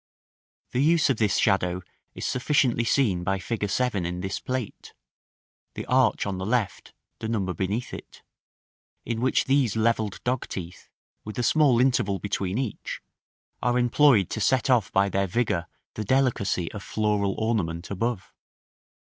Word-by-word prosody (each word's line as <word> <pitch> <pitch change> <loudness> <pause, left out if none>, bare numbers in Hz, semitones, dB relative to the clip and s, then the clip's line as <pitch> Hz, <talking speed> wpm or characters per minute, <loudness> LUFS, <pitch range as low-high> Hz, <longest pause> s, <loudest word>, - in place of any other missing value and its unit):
The 125 - 0
use 160 0 +4
of 125 - -1
this 105 -2 +2
shadow 90 -3 +1 0.3
is - - -5
sufficiently 125 -3 +1
seen 105 -9 +2
by 95 +2 0
fig. 105 +2 -3
7 110 -3 0
in 90 +1 -3
this 95 0 -3
plate 130 -4 -5 0.8
(the - - -5
arch 125 -4 +2
on 95 -2 -3
the 95 - -3
left, 115 -3 -2 0.2
the 110 - -4
number 100 -5 -1
beneath 100 +6 -3
it), - - -10 0.8
in 115 0 -2
which 130 - +2
these 135 -5 +2
levelled 110 -2 0
dogteeth, 100 -8 -4 0.3
with 105 - -8
a 120 - 0
small 140 -2 +4
interval 120 -6 +2
between 100 0 -2
each, 130 -5 -4 0.6
are 125 0 +1
employed 120 - +4
to 110 - -3
set 130 +6 +2
off 120 -6 +2
by 100 +1 +3
their 100 0 0
vigor 90 -4 0 0.3
the 110 - -4
delicacy 110 -8 +1
of 105 - -7
floral 105 -2 0
ornament 90 -7 -1
above. 100 -1 -3
110 Hz, 150 wpm, -26 LUFS, 95-125 Hz, 0.8 s, use